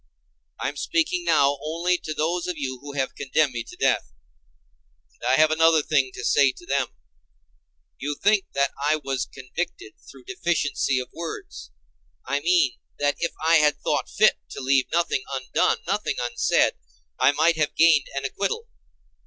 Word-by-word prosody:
I - - -1
am 145 +2 -5
speaking 335 - 0
now 140 0 +3
only 170 +4 0
to 155 - -5
those 170 +4 -1
of 180 -3 -3
you 130 -3 -4
who 145 +2 -9
have 135 -2 -2
condemned 140 0 0
me 120 -1 -3
to - - -12
death. - - +1 1.0
And - - -22
I 130 - +5
have 155 +2 +4
another 160 -1 +4
thing 140 -4 +1
to - - -5
say 140 -2 +4
to 175 - -15
them: 140 -4 0 1.1
You 145 +2 -3
think 205 -1 +3
that 140 0 +1
I 150 +2 +3
was 135 -4 -3
convicted 175 - -6 0.2
through - - -14
deficiency 170 - -1
of 125 - -4
words—I 70 - -7
mean, 165 -4 +2 0.2
that 145 0 +1
if 170 - -2
I 165 +1 +6
had 150 -1 +3
thought - - -1
fit - - +3
to - - -8
leave 135 0 +2
nothing 170 -5 +1
undone, 130 -1 +1
nothing 195 -5 -1
unsaid, 120 0 +2 0.5
I - - +5
might 160 +2 +3
have 155 -1 0
gained 160 -4 +5
an 140 0 -3
acquittal. 325 - -2
145 Hz, 165 wpm, -24 LUFS, 135-170 Hz, 1.1 s, I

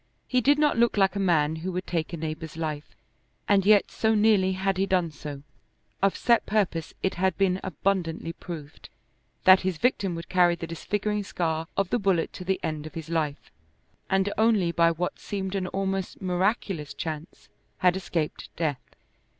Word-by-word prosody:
He 255 -1 +2
did 285 +4 +4
not 295 -5 +2
look 235 -2 +3
like 195 -1 +3
a - - -1
man 160 -5 +2
who 180 +4 -4
would 180 +1 -3
take 165 -2 -2
a 170 - -4
neighbor's 155 0 -5
life, 155 -2 -4 0.5
and 200 -1 +4
yet 205 0 +5
so 220 0 +1
nearly 205 -3 +4
had 190 0 -1
he 195 +1 +1
done 180 -4 +1
so, 145 -2 -8 0.6
of 195 0 +2
set 235 -1 +3
purpose 185 -6 0
it 190 - +1
had 190 -2 +2
been 190 -1 +2
abundantly 175 -2 -1
proved, 160 -4 -9 0.5
that 185 0 +8
his 185 -3 -2
victim 195 -5 +1
would 165 -1 -7
carry 175 -2 +4
the 170 - -6
disfiguring 205 +5 -2
scar 160 -4 -2
of 195 -2 0
the 245 - +2
bullet 190 -5 +1
to - - -7
the 190 +1 0
end 155 -1 -3
of - - -12
his 165 0 -6
life, 155 -3 -2 0.6
and 195 +1 +1
only 215 -6 +3
by 170 0 +4
what 170 +2 -3
seemed 190 -2 -4
an 190 -2 -1
almost 195 0 -2
miraculous 185 -3 -1
chance 160 0 -6 0.3
had 180 0 +3
escaped 170 -4 -3
death. 150 -6 -1
185 Hz, 180 wpm, -26 LUFS, 165-195 Hz, 0.6 s, that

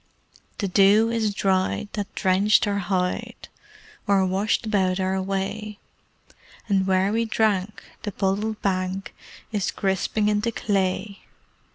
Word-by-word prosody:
The 205 - -1
dew 205 +4 +4
is 225 -2 0
dried 195 0 0
that 205 0 -5
drenched 195 +2 +3
our 200 -1 0
hide 180 -1 -2 0.6
Or 195 -1 +3
washed 195 +5 0
about 190 -3 +1
our 190 0 0
way; 195 +2 -3 0.9
And 195 -2 +1
where 190 +1 +2
we 230 +1 +1
drank, 215 -3 0 0.2
the 205 - -4
puddled 205 +3 -1
bank 185 0 -2 0.4
Is 205 -3 -1
crisping 195 +2 0
into 210 +2 +1
clay. 195 -1 -1
200 Hz, 125 wpm, -24 LUFS, 190-210 Hz, 0.9 s, dew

